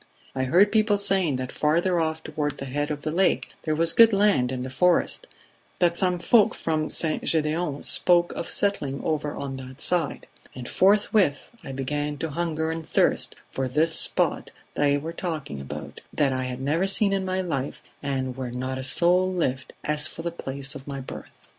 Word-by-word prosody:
I 130 Hz, 0 st, -1 dB
heard 185 Hz, +9 st, +4 dB
people 215 Hz, -1 st, +3 dB
saying 190 Hz, -7 st, 0 dB
that 130 Hz, 0 st, -4 dB
farther 170 Hz, +4 st, +1 dB
off 160 Hz, 0 st, -2 dB
toward 150 Hz, -1 st, -3 dB
the 135 Hz, -, -6 dB
head 145 Hz, +3 st, -2 dB
of 150 Hz, -1 st, -4 dB
the 155 Hz, -, -2 dB
Lake 185 Hz, +4 st, +1 dB
there 155 Hz, -, -1 dB
was 165 Hz, +1 st, +2 dB
good 230 Hz, -1 st, +7 dB
land 195 Hz, -12 st, +3 dB
in 125 Hz, -1 st, -3 dB
the 130 Hz, -, -6 dB
forest; 180 Hz, -, +1 dB, 0.5 s
that 175 Hz, -1 st, +2 dB
some 180 Hz, -1 st, +1 dB
folk 210 Hz, +4 st, +4 dB
from 155 Hz, -1 st, -1 dB
St. 160 Hz, -2 st, +1 dB
Gedeon 155 Hz, -1 st, 0 dB
spoke 175 Hz, -1 st, +5 dB
of -, -, -5 dB
settling 145 Hz, -10 st, -1 dB
over 150 Hz, -2 st, -2 dB
on 135 Hz, -1 st, -5 dB
that 130 Hz, 0 st, -10 dB
side; 170 Hz, -6 st, -1 dB, 0.3 s
and 125 Hz, -1 st, -7 dB
forthwith 200 Hz, -5 st, +2 dB
I -, -, -7 dB
began 145 Hz, +2 st, -3 dB
to 160 Hz, +1 st, -4 dB
hunger 160 Hz, 0 st, -2 dB
and 165 Hz, 0 st, -4 dB
thirst -, -, +1 dB, 0.2 s
for 135 Hz, -1 st, -2 dB
this 155 Hz, +6 st, +1 dB
spot -, -, 0 dB, 0.2 s
they 145 Hz, -1 st, +2 dB
were 160 Hz, +3 st, -5 dB
talking 155 Hz, -, -5 dB
about, 70 Hz, -, -8 dB
that 140 Hz, -3 st, +1 dB
I 130 Hz, 0 st, -2 dB
had 125 Hz, 0 st, -5 dB
never 160 Hz, +8 st, +1 dB
seen 200 Hz, 0 st, +2 dB
in 195 Hz, -1 st, 0 dB
my 185 Hz, 0 st, -1 dB
life 140 Hz, -7 st, -3 dB, 0.2 s
and 130 Hz, -3 st, -2 dB
where 130 Hz, -1 st, -4 dB
not 130 Hz, +2 st, -4 dB
a -, -, -4 dB
soul 180 Hz, +6 st, +4 dB
lived, 130 Hz, -7 st, -2 dB
as 150 Hz, 0 st, +2 dB
for 160 Hz, -, -8 dB
the 170 Hz, -, -2 dB
place 140 Hz, -4 st, -4 dB
of 135 Hz, -, -10 dB
my 140 Hz, -1 st, -5 dB
birth 130 Hz, -, -8 dB
155 Hz, 190 wpm, -25 LUFS, 135-175 Hz, 0.5 s, good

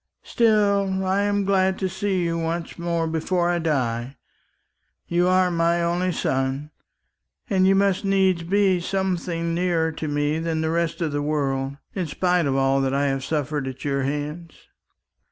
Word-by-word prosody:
Still, 200 Hz, -4 st, +2 dB
I 190 Hz, +2 st, +1 dB
am 205 Hz, -1 st, 0 dB
glad 190 Hz, -1 st, +2 dB
to 190 Hz, -, -1 dB
see 190 Hz, 0 st, -1 dB
you 170 Hz, 0 st, -1 dB
once 165 Hz, +1 st, -3 dB
more 170 Hz, -1 st, -1 dB
before 170 Hz, +2 st, 0 dB
I 175 Hz, -, 0 dB
die. 130 Hz, -5 st, -1 dB, 0.9 s
You 175 Hz, +1 st, +2 dB
are 185 Hz, 0 st, +3 dB
my 170 Hz, 0 st, +1 dB
only 175 Hz, +2 st, 0 dB
son, 135 Hz, -1 st, -2 dB, 0.8 s
and 190 Hz, -1 st, +4 dB
you 195 Hz, -, +5 dB
must 195 Hz, 0 st, +2 dB
needs 190 Hz, -3 st, +2 dB
be 190 Hz, +1 st, +2 dB
something 175 Hz, -2 st, -2 dB
nearer 170 Hz, -2 st, +1 dB
to 155 Hz, 0 st, -5 dB
me 145 Hz, +1 st, 0 dB
than 165 Hz, -1 st, -1 dB
the 160 Hz, 0 st, 0 dB
rest 170 Hz, 0 st, -1 dB
of 160 Hz, -3 st, 0 dB
the 145 Hz, 0 st, -1 dB
world, 140 Hz, -2 st, -1 dB, 0.2 s
in 185 Hz, -4 st, -2 dB
spite 180 Hz, +1 st, +1 dB
of 135 Hz, -, 0 dB
all 135 Hz, 0 st, +2 dB
that 135 Hz, 0 st, 0 dB
I 140 Hz, 0 st, +1 dB
have 135 Hz, -1 st, -2 dB
suffered 150 Hz, -1 st, -2 dB
at 130 Hz, +1 st, -7 dB
your 140 Hz, -1 st, 0 dB
hands." 150 Hz, +4 st, -4 dB
170 Hz, 170 wpm, -23 LUFS, 145-185 Hz, 0.9 s, you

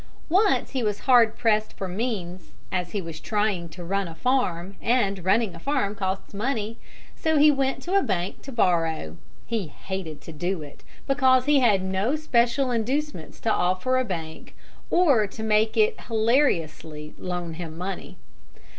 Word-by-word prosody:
Once 390 Hz, +5 st, +3 dB
he 265 Hz, -, -1 dB
was 210 Hz, -2 st, -1 dB
hard 240 Hz, -4 st, +5 dB
pressed 215 Hz, -2 st, +1 dB
for 190 Hz, -, -5 dB
means, 185 Hz, -3 st, -4 dB, 0.2 s
as 180 Hz, -2 st, -2 dB
he 205 Hz, -, -2 dB
was 165 Hz, -4 st, -7 dB
trying 205 Hz, -5 st, -1 dB
to 175 Hz, +2 st, -9 dB
run 195 Hz, +2 st, -1 dB
a 165 Hz, -, -9 dB
farm, 195 Hz, -4 st, 0 dB
and 200 Hz, -6 st, +1 dB
running 195 Hz, +1 st, +2 dB
a 170 Hz, -, -10 dB
farm 260 Hz, -, 0 dB
costs 190 Hz, -1 st, -3 dB
money: 225 Hz, 0 st, -2 dB, 0.4 s
so 315 Hz, -1 st, +1 dB
he 300 Hz, +1 st, +7 dB
went 270 Hz, -1 st, -1 dB
to 360 Hz, -, -3 dB
a 395 Hz, -, +5 dB
bank 180 Hz, -, -2 dB
to 275 Hz, -, -9 dB
borrow. 165 Hz, -, +1 dB, 0.3 s
He 225 Hz, -6 st, -2 dB
hated 165 Hz, -1 st, -6 dB
to -, -, -10 dB
do 175 Hz, +2 st, -3 dB
it, 145 Hz, -, -13 dB, 0.2 s
because 260 Hz, -2 st, +4 dB
he 290 Hz, -1 st, +5 dB
had 210 Hz, -7 st, +3 dB
no 190 Hz, +8 st, 0 dB
special 255 Hz, -3 st, +1 dB
inducements 245 Hz, -, -2 dB
to 225 Hz, -, +1 dB
offer 185 Hz, +9 st, +1 dB
a -, -, +2 dB
bank 165 Hz, -7 st, -6 dB, 0.3 s
or 280 Hz, -, +4 dB
to 220 Hz, +2 st, -8 dB
make 220 Hz, 0 st, +2 dB
it 440 Hz, +1 st, +3 dB
hilariously 170 Hz, -, 0 dB
loan 175 Hz, -2 st, -4 dB
him 160 Hz, -1 st, -7 dB
money. 185 Hz, +2 st, -5 dB
210 Hz, 165 wpm, -25 LUFS, 175-255 Hz, 0.4 s, he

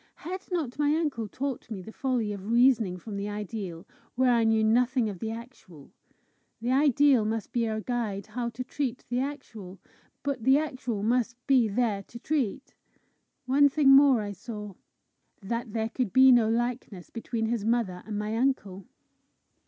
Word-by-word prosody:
Had 370 Hz, +3 st, -5 dB
not 300 Hz, -7 st, -2 dB
my 295 Hz, +1 st, +3 dB
uncle 290 Hz, -9 st, -1 dB
taught 265 Hz, +3 st, -5 dB
me 200 Hz, -5 st, -6 dB
the 220 Hz, -, -10 dB
folly 240 Hz, -5 st, -1 dB
of 200 Hz, +1 st, -7 dB
reasoning 235 Hz, -6 st, +3 dB
from 200 Hz, +3 st, -7 dB
the 200 Hz, +1 st, -3 dB
ideal 205 Hz, -4 st, -6 dB, 0.3 s
where 255 Hz, 0 st, +3 dB
I 230 Hz, -1 st, +3 dB
knew 225 Hz, -1 st, +3 dB
nothing 245 Hz, +2 st, +2 dB
of 195 Hz, -4 st, -7 dB
the 225 Hz, -, -3 dB
actual! 225 Hz, -, -10 dB, 0.7 s
The 235 Hz, +2 st, -2 dB
ideal 280 Hz, -2 st, +4 dB
must 220 Hz, 0 st, -3 dB
be 235 Hz, -2 st, 0 dB
our 220 Hz, 0 st, -2 dB
guide 220 Hz, -5 st, -3 dB
how 240 Hz, -1 st, -4 dB
to 240 Hz, +2 st, -6 dB
treat 255 Hz, -1 st, -4 dB
the 245 Hz, +1 st, 0 dB
actual, 225 Hz, -9 st, -6 dB, 0.5 s
but 280 Hz, -4 st, -2 dB
the 265 Hz, +3 st, +5 dB
actual 255 Hz, -8 st, -3 dB
must 235 Hz, +1 st, +1 dB
be 260 Hz, -5 st, +4 dB
there 215 Hz, -1 st, 0 dB
to 230 Hz, -, -12 dB
treat! 265 Hz, -2 st, -2 dB, 0.7 s
One 285 Hz, +3 st, +5 dB
thing 280 Hz, 0 st, +3 dB
more 270 Hz, -3 st, +7 dB
I 205 Hz, -1 st, -4 dB
saw 210 Hz, 0 st, -8 dB, 0.7 s
that 230 Hz, +3 st, -4 dB
there 225 Hz, 0 st, -1 dB
could 240 Hz, -3 st, -2 dB
be 260 Hz, +3 st, +7 dB
no 235 Hz, -3 st, +5 dB
likeness 235 Hz, -5 st, -3 dB
between 230 Hz, -1 st, -3 dB
his 225 Hz, -2 st, -1 dB
mother 220 Hz, -5 st, 0 dB
and 210 Hz, -1 st, -4 dB
my 210 Hz, +1 st, -2 dB
uncle! 215 Hz, -7 st, -1 dB
235 Hz, 170 wpm, -28 LUFS, 210-260 Hz, 0.7 s, more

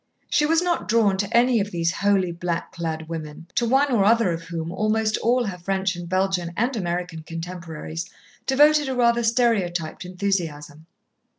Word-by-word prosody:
She 295 Hz, -, +3 dB
was 325 Hz, +2 st, +3 dB
not 350 Hz, -1 st, -1 dB
drawn 215 Hz, -3 st, +3 dB
to 200 Hz, +1 st, -1 dB
any 240 Hz, 0 st, +4 dB
of 205 Hz, 0 st, -1 dB
these 170 Hz, -3 st, 0 dB
holy, 195 Hz, -2 st, +1 dB
black 170 Hz, 0 st, -3 dB
clad 160 Hz, -2 st, -4 dB
women, 160 Hz, -1 st, -7 dB
to 240 Hz, -, +1 dB
one 275 Hz, +2 st, +3 dB
or 225 Hz, -5 st, +3 dB
other 225 Hz, -2 st, +4 dB
of 165 Hz, 0 st, -3 dB
whom 165 Hz, -1 st, -4 dB
almost 215 Hz, +2 st, +1 dB
all 245 Hz, +2 st, +2 dB
her 185 Hz, -4 st, -5 dB
French 190 Hz, +1 st, -1 dB
and 175 Hz, -1 st, -7 dB
Belgian 185 Hz, -2 st, 0 dB
and 240 Hz, +4 st, 0 dB
American 175 Hz, -4 st, -3 dB
contemporaries 165 Hz, 0 st, -6 dB, 0.4 s
devoted 295 Hz, +1 st, +4 dB
a 260 Hz, -, -2 dB
rather 235 Hz, -1 st, +3 dB
stereotyped 210 Hz, -10 st, 0 dB
enthusiasm. 165 Hz, -5 st, -3 dB
190 Hz, 170 wpm, -23 LUFS, 170-230 Hz, 0.4 s, any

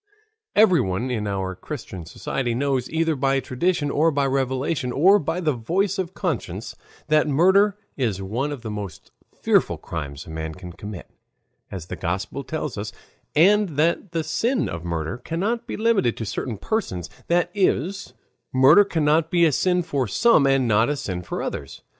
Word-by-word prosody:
Everyone 130 Hz, -, +3 dB
in 105 Hz, -4 st, -2 dB
our 95 Hz, -2 st, -2 dB
Christian 90 Hz, -1 st, -8 dB
society 120 Hz, +6 st, -3 dB
knows, 130 Hz, -1 st, 0 dB
either 160 Hz, 0 st, +1 dB
by 135 Hz, 0 st, +1 dB
tradition 145 Hz, +4 st, -1 dB
or 155 Hz, +4 st, +3 dB
by 140 Hz, -3 st, +1 dB
revelation 130 Hz, 0 st, -1 dB
or 190 Hz, +10 st, +5 dB
by 165 Hz, +1 st, -2 dB
the 155 Hz, -4 st, +1 dB
voice 190 Hz, -, -1 dB
of 185 Hz, -1 st, -3 dB
conscience, 115 Hz, -, -3 dB, 0.3 s
that 155 Hz, 0 st, +3 dB
murder 190 Hz, +7 st, +4 dB, 0.2 s
is 115 Hz, -8 st, 0 dB
one 115 Hz, +10 st, -2 dB
of 135 Hz, -4 st, -6 dB
the 110 Hz, -, -4 dB
most 100 Hz, -6 st, -7 dB, 0.3 s
fearful -, -, +2 dB
crimes 70 Hz, -4 st, -6 dB
a -, -, -10 dB
man 80 Hz, 0 st, -5 dB
can 90 Hz, -1 st, -9 dB
commit, 100 Hz, 0 st, -8 dB, 0.6 s
as 95 Hz, -5 st, -6 dB
the -, -, -6 dB
Gospel 95 Hz, +10 st, -3 dB
tells 150 Hz, -8 st, -4 dB
us, 105 Hz, +1 st, -4 dB, 0.4 s
and 190 Hz, -1 st, +4 dB
that 165 Hz, +4 st, +1 dB
the 165 Hz, -1 st, -1 dB
sin 230 Hz, -, 0 dB
of 85 Hz, 0 st, -5 dB
murder 85 Hz, +5 st, -3 dB
cannot 195 Hz, -, -2 dB
be -, -, -4 dB
limited 215 Hz, -, +2 dB
to 110 Hz, -, -4 dB
certain 110 Hz, +2 st, -4 dB
persons, 95 Hz, -, -2 dB, 0.2 s
that 175 Hz, 0 st, +2 dB
is, 195 Hz, -1 st, 0 dB, 0.4 s
murder 135 Hz, +10 st, +7 dB
cannot 160 Hz, -3 st, +1 dB
be 170 Hz, -1 st, +4 dB
a 160 Hz, -, +4 dB
sin 180 Hz, +5 st, +1 dB
for 140 Hz, -6 st, -1 dB
some 155 Hz, -, +4 dB
and 135 Hz, -2 st, +3 dB
not 110 Hz, +2 st, +3 dB
a 145 Hz, -, 0 dB
sin 90 Hz, -10 st, -4 dB
for 85 Hz, -, -4 dB
others. -, -, -6 dB
140 Hz, 170 wpm, -23 LUFS, 105-170 Hz, 0.6 s, murder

